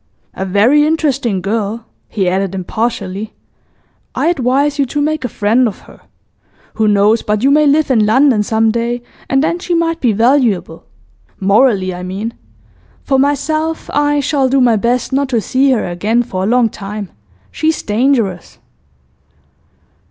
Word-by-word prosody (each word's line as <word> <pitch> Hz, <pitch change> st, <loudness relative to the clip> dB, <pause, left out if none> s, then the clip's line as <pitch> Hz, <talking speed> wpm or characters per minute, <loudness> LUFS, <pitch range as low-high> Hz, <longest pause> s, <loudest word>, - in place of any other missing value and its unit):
'A 190 Hz, -, -4 dB
very 225 Hz, +10 st, +3 dB
interesting 280 Hz, -, 0 dB
girl,' 215 Hz, +2 st, -3 dB, 0.2 s
he 195 Hz, -4 st, -2 dB
added 190 Hz, +1 st, -1 dB
impartially. 210 Hz, +1 st, -4 dB, 0.8 s
'I -, -, -1 dB
advise 280 Hz, -1 st, 0 dB
you 280 Hz, -, +3 dB
to 295 Hz, -, -3 dB
make 310 Hz, +1 st, -1 dB
a 250 Hz, -, -2 dB
friend 225 Hz, +5 st, +1 dB
of 210 Hz, -, -7 dB
her. -, -, -17 dB, 0.7 s
Who 220 Hz, -1 st, 0 dB
knows 210 Hz, +2 st, +3 dB
but 210 Hz, +1 st, -2 dB
you 275 Hz, -, +4 dB
may 300 Hz, +1 st, +4 dB
live 290 Hz, 0 st, +2 dB
in 225 Hz, -4 st, +3 dB
London 250 Hz, 0 st, +3 dB
some 220 Hz, +1 st, +1 dB
day, 235 Hz, +1 st, -2 dB, 0.3 s
and 270 Hz, +1 st, +2 dB
then 335 Hz, +2 st, -1 dB
she 355 Hz, -1 st, -2 dB
might 330 Hz, 0 st, 0 dB
be 245 Hz, -, +2 dB
valuable 225 Hz, -, +1 dB, 0.5 s
morally, 200 Hz, -1 st, +2 dB
I 180 Hz, -, -7 dB
mean. 195 Hz, +5 st, -5 dB, 0.7 s
For 270 Hz, -1 st, +1 dB
myself, 310 Hz, +3 st, -1 dB
I 290 Hz, 0 st, +1 dB
shall 275 Hz, -2 st, 0 dB
do 270 Hz, +1 st, +2 dB
my 245 Hz, -3 st, +4 dB
best 240 Hz, +5 st, -1 dB
not 275 Hz, 0 st, 0 dB
to 240 Hz, -3 st, +1 dB
see 260 Hz, +7 st, +1 dB
her 255 Hz, -4 st, +1 dB
again 210 Hz, +7 st, 0 dB
for 190 Hz, -5 st, -4 dB
a -, -, -1 dB
long 240 Hz, +1 st, +3 dB
time; 205 Hz, -1 st, -7 dB, 0.4 s
she's 315 Hz, 0 st, -1 dB
dangerous. 215 Hz, -5 st, -1 dB
235 Hz, 160 wpm, -15 LUFS, 205-280 Hz, 0.8 s, you